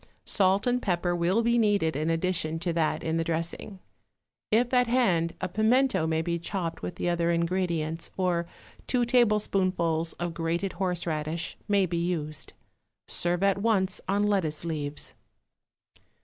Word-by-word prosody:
Salt 195 Hz, 0 st, +2 dB
and 250 Hz, 0 st, +1 dB
pepper 175 Hz, -2 st, 0 dB
will 180 Hz, +7 st, +1 dB
be 235 Hz, +1 st, +3 dB
needed 205 Hz, -8 st, +2 dB
in 155 Hz, +3 st, -1 dB
addition 165 Hz, -1 st, 0 dB
to 170 Hz, +1 st, -2 dB
that 165 Hz, -2 st, 0 dB
in 160 Hz, 0 st, 0 dB
the 165 Hz, -, +1 dB
dressing. 170 Hz, +4 st, -3 dB, 0.7 s
If 240 Hz, +3 st, +2 dB
at 250 Hz, -1 st, +4 dB
hand, 185 Hz, -10 st, +2 dB
a -, -, -2 dB
pimento 220 Hz, -1 st, +2 dB
may 160 Hz, 0 st, 0 dB
be 170 Hz, 0 st, -1 dB
chopped 170 Hz, -1 st, -4 dB
with 180 Hz, -, -5 dB
the 175 Hz, -, -3 dB
other 170 Hz, -1 st, +1 dB
ingredients, 170 Hz, -2 st, -1 dB
or 175 Hz, -2 st, 0 dB, 0.4 s
two 245 Hz, -2 st, +2 dB
tablespoonfuls 190 Hz, -8 st, +2 dB
of 175 Hz, -1 st, -4 dB
grated 170 Hz, +3 st, -2 dB
horseradish 170 Hz, -3 st, -2 dB
may 200 Hz, -2 st, +3 dB
be 170 Hz, -1 st, -2 dB
used. 155 Hz, -4 st, -3 dB, 0.5 s
Serve 175 Hz, +2 st, 0 dB
at 195 Hz, 0 st, +3 dB
once 200 Hz, -3 st, +1 dB
on 200 Hz, +2 st, +1 dB
lettuce 180 Hz, -7 st, 0 dB
leaves. 150 Hz, -3 st, -4 dB
175 Hz, 150 wpm, -27 LUFS, 165-200 Hz, 0.7 s, at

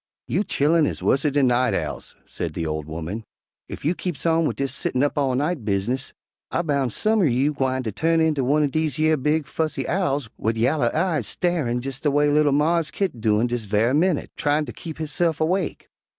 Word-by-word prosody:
"You 190 Hz, -, +1 dB
chillen 155 Hz, -2 st, +2 dB
is -, -, -5 dB
wusser 145 Hz, +2 st, +2 dB
dan 140 Hz, -1 st, +3 dB
night 125 Hz, 0 st, +2 dB
owls," -, -, -4 dB
said -, -, -5 dB
the 80 Hz, -, -2 dB
old 75 Hz, -1 st, -3 dB
woman. 85 Hz, +8 st, -5 dB, 0.5 s
"Ef -, -, -8 dB
you 160 Hz, -, +3 dB
keeps 175 Hz, -5 st, -5 dB
on 165 Hz, -1 st, +3 dB
wid -, -, -2 dB
dis 135 Hz, -1 st, -2 dB
settin' 130 Hz, -1 st, -1 dB
up 145 Hz, -, 0 dB
all 135 Hz, -3 st, +1 dB
night 150 Hz, 0 st, -1 dB
bizness, 105 Hz, +6 st, -1 dB, 0.4 s
I -, -, -1 dB
boun' 140 Hz, -5 st, 0 dB
some 215 Hz, -, +1 dB
er -, -, +4 dB
you 135 Hz, +2 st, +2 dB
gwine 130 Hz, -2 st, -1 dB
turn 165 Hz, +9 st, +1 dB
inter 160 Hz, -3 st, +2 dB
one'r 145 Hz, +4 st, +2 dB
dese 155 Hz, -1 st, -1 dB
yer 155 Hz, 0 st, +3 dB
big, 150 Hz, +2 st, 0 dB
fussy 155 Hz, +3 st, -2 dB
owls 145 Hz, -9 st, 0 dB
wid 110 Hz, +1 st, 0 dB
yaller 125 Hz, +2 st, +2 dB
eyes 160 Hz, -, 0 dB
styarin', 150 Hz, -10 st, -1 dB
jes' 135 Hz, -1 st, -4 dB
de 150 Hz, -, +1 dB
way 145 Hz, +1 st, +3 dB
li'l 150 Hz, 0 st, +3 dB
Mars 155 Hz, +2 st, +2 dB
Kit 150 Hz, -, -3 dB
doin' 110 Hz, +1 st, +2 dB
dis 120 Hz, -2 st, -2 dB
ve'y 110 Hz, +5 st, +2 dB
minnit, 170 Hz, 0 st, +1 dB
tryin' 150 Hz, +1 st, +1 dB
ter -, -, -8 dB
keep 160 Hz, -2 st, -8 dB
hisse'f 160 Hz, +1 st, -1 dB
awake. 175 Hz, +3 st, -1 dB
145 Hz, 205 wpm, -23 LUFS, 125-160 Hz, 0.5 s, er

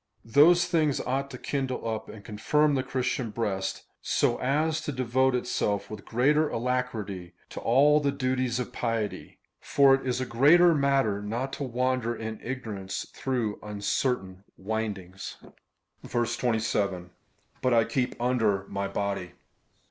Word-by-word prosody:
Those 160 Hz, +9 st, +6 dB
things 160 Hz, -5 st, +1 dB
ought 135 Hz, +2 st, -2 dB
to 130 Hz, -, -8 dB
kindle 130 Hz, -3 st, -3 dB
up 110 Hz, -1 st, -3 dB
and 105 Hz, -2 st, -11 dB
confirm 145 Hz, +8 st, +2 dB
the 135 Hz, -, +1 dB
Christian 130 Hz, -2 st, -2 dB
breast, 100 Hz, -4 st, -2 dB, 0.2 s
so -, -, +1 dB
as 155 Hz, +4 st, +1 dB
to 155 Hz, -, -3 dB
deA^ote 130 Hz, 0 st, +1 dB
itself 105 Hz, -5 st, -1 dB
with 105 Hz, -2 st, -8 dB
greater 145 Hz, +6 st, +2 dB
alacrity 110 Hz, -7 st, -3 dB, 0.2 s
to -, -, -7 dB
all 145 Hz, +5 st, +4 dB
the 140 Hz, -1 st, +1 dB
duties 130 Hz, -2 st, -1 dB
of 125 Hz, 0 st, -4 dB
piety; 115 Hz, -4 st, -3 dB, 0.2 s
^ -, -, -30 dB
for 140 Hz, -1 st, +5 dB
it 135 Hz, -, +1 dB
is 125 Hz, -1 st, -1 dB
a 130 Hz, -, -1 dB
great 140 Hz, +8 st, +5 dB
matter 140 Hz, -, +3 dB
not 120 Hz, +6 st, -3 dB
to 145 Hz, -, -4 dB
wander 125 Hz, -2 st, 0 dB
in 110 Hz, -1 st, -6 dB
ignorance 110 Hz, -7 st, -5 dB
through 120 Hz, -6 st, -2 dB
uncertain 100 Hz, -1 st, -2 dB
windings. 95 Hz, -3 st, -4 dB, 0.7 s
27. 110 Hz, -6 st, -1 dB, 0.5 s
But 130 Hz, -, +2 dB
I 115 Hz, -, +5 dB
keep 125 Hz, +2 st, -2 dB
under 115 Hz, -6 st, +1 dB
my 100 Hz, 0 st, -2 dB
body? 100 Hz, -2 st, -3 dB
125 Hz, 140 wpm, -27 LUFS, 105-135 Hz, 0.7 s, Those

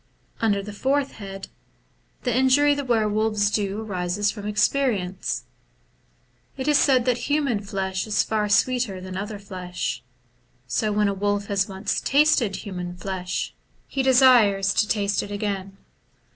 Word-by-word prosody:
Under 205 Hz, -3 st, +1 dB
the 210 Hz, +1 st, -8 dB
fourth 275 Hz, +5 st, 0 dB
head, 195 Hz, -2 st, -8 dB, 0.8 s
the 245 Hz, -3 st, 0 dB
injury 265 Hz, +3 st, +4 dB
the 285 Hz, 0 st, -3 dB
were 230 Hz, -4 st, +1 dB
wolves 210 Hz, -1 st, +1 dB
do 205 Hz, 0 st, -1 dB
arises 200 Hz, 0 st, -1 dB
from 205 Hz, -2 st, -7 dB
experience. 205 Hz, -3 st, 0 dB, 1.1 s
It 265 Hz, +1 st, -4 dB
is 295 Hz, -1 st, +5 dB
said 255 Hz, -4 st, +3 dB
that 245 Hz, +1 st, 0 dB
human 285 Hz, -7 st, +1 dB
flesh 195 Hz, -1 st, -3 dB
is 210 Hz, -, +2 dB
far 210 Hz, -1 st, -1 dB
sweeter 235 Hz, -3 st, +1 dB
than 185 Hz, 0 st, -8 dB
other 205 Hz, +2 st, -4 dB
flesh; 185 Hz, -3 st, -5 dB, 0.6 s
so 215 Hz, -2 st, -1 dB
when 210 Hz, 0 st, +2 dB
a 200 Hz, -, 0 dB
wolf 205 Hz, +1 st, -1 dB
has 200 Hz, -1 st, 0 dB
once 195 Hz, +2 st, -2 dB
tasted 275 Hz, -8 st, +3 dB
human 180 Hz, -3 st, -6 dB
flesh, 185 Hz, 0 st, -4 dB, 0.3 s
he 270 Hz, -, -2 dB
desires 245 Hz, -7 st, +5 dB
to 210 Hz, -, +2 dB
taste 200 Hz, -2 st, 0 dB
it -, -, -7 dB
again. 200 Hz, -2 st, -4 dB
205 Hz, 145 wpm, -24 LUFS, 195-245 Hz, 1.1 s, is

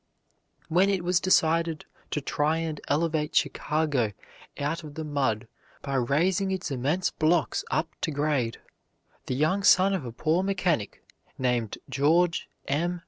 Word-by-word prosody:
When 185 Hz, +4 st, +3 dB
it 190 Hz, -3 st, 0 dB
was 180 Hz, 0 st, +2 dB
decided 165 Hz, -3 st, +2 dB, 0.2 s
to 150 Hz, -, -2 dB
try 150 Hz, +3 st, 0 dB
and 160 Hz, -2 st, -3 dB
elevate 155 Hz, 0 st, 0 dB
Chicago 145 Hz, -8 st, +1 dB, 0.4 s
out 155 Hz, +4 st, -2 dB
of 150 Hz, -1 st, -10 dB
the 160 Hz, -, -4 dB
mud 130 Hz, -7 st, -1 dB, 0.4 s
by 140 Hz, -, -4 dB
raising 165 Hz, +10 st, +1 dB
its 190 Hz, -4 st, -3 dB
immense 140 Hz, +8 st, 0 dB
blocks 155 Hz, -, +1 dB
up -, -, 0 dB
to -, -, 0 dB
grade, 145 Hz, -6 st, 0 dB, 0.7 s
the 130 Hz, -, -1 dB
young 155 Hz, +8 st, +1 dB
son 195 Hz, 0 st, +5 dB
of 190 Hz, -, -1 dB
a 120 Hz, -, -6 dB
poor 155 Hz, +9 st, +1 dB
mechanic, 180 Hz, -, -1 dB, 0.3 s
named 125 Hz, -4 st, -1 dB
George 165 Hz, +5 st, +2 dB, 0.2 s
M. 175 Hz, +5 st, 0 dB
155 Hz, 140 wpm, -27 LUFS, 140-175 Hz, 0.7 s, son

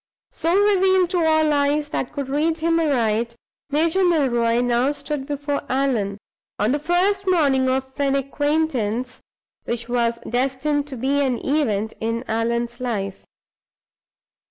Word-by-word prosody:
So 335 Hz, +4 st, +1 dB
revealed 380 Hz, -3 st, +3 dB
to 355 Hz, -3 st, +1 dB
all 315 Hz, -1 st, +3 dB
eyes 290 Hz, +1 st, +1 dB
that 260 Hz, -, -3 dB
could 280 Hz, -2 st, -4 dB
read 305 Hz, +4 st, 0 dB
him 330 Hz, +1 st, +1 dB
aright, 235 Hz, -6 st, 0 dB, 0.3 s
Major 325 Hz, +6 st, +2 dB
Milroy 240 Hz, -9 st, +2 dB
now 245 Hz, +3 st, +1 dB
stood 290 Hz, -2 st, -5 dB
before 285 Hz, 0 st, -2 dB
Allan, 245 Hz, -7 st, 0 dB, 0.4 s
on 210 Hz, +3 st, +1 dB
the 290 Hz, -, +1 dB
first 375 Hz, +5 st, +1 dB
morning 280 Hz, -8 st, +3 dB
of 265 Hz, 0 st, -2 dB
an 275 Hz, -1 st, +2 dB
acquaintance 275 Hz, -4 st, -1 dB, 0.4 s
which 235 Hz, 0 st, -3 dB
was 235 Hz, -1 st, 0 dB
destined 270 Hz, +4 st, 0 dB
to 270 Hz, -3 st, -7 dB
be 275 Hz, +4 st, +1 dB
an 255 Hz, -3 st, 0 dB
event 220 Hz, -8 st, 0 dB
in 230 Hz, +2 st, -2 dB
Allan's 235 Hz, +2 st, -1 dB
life. 205 Hz, -6 st, -3 dB
275 Hz, 135 wpm, -22 LUFS, 240-310 Hz, 0.4 s, revealed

